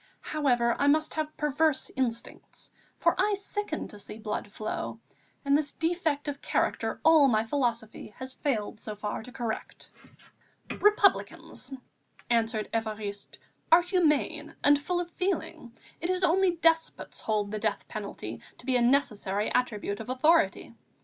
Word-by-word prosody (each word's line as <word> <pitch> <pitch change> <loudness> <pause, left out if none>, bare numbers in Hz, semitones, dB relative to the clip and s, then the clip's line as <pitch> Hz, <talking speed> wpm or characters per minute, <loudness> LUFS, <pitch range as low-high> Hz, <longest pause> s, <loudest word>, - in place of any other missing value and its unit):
However, 245 -6 +1
I 285 - +3
must 310 +2 +3
have 310 -1 -3
perverse 300 0 +1
instincts, 235 -3 -4 0.3
for - - +3
I 415 -1 +3
sicken 400 -3 -4
to 210 - -11
see 210 - -8
blood 210 -2 -4
flow, 215 +1 -4 0.5
and 280 0 +4
this 290 -1 0
defect 325 -3 -1
of 285 -1 -4
character - - 0
all 315 -3 +7
my 220 -3 +2
philosophy 230 -5 -2
has 260 0 -6
failed 220 -7 -2
so 215 - -6
far 210 0 -4
to 250 - -11
correct." 235 -3 -5 0.9
"Republicans," 405 -9 +2 0.6
answered 225 -2 +1
Évariste, 215 -2 -3 0.3
"are 340 +2 +8
humane 345 -5 +1
and 290 0 +6
full 350 +4 -1
of 350 0 -4
feeling. 365 -10 -2 0.3
It 340 - -3
is 370 0 0
only 360 +1 +3
despots 325 -1 +1
hold 210 -2 -1
the 215 - -3
death - - -1
penalty - - -6 0.2
to - - -15
be 260 -1 +2
a - - +1
necessary 215 -6 +1
attribute 210 -4 -1
of 225 - -7
authority. 310 +6 +2
275 Hz, 145 wpm, -28 LUFS, 225-320 Hz, 0.9 s, are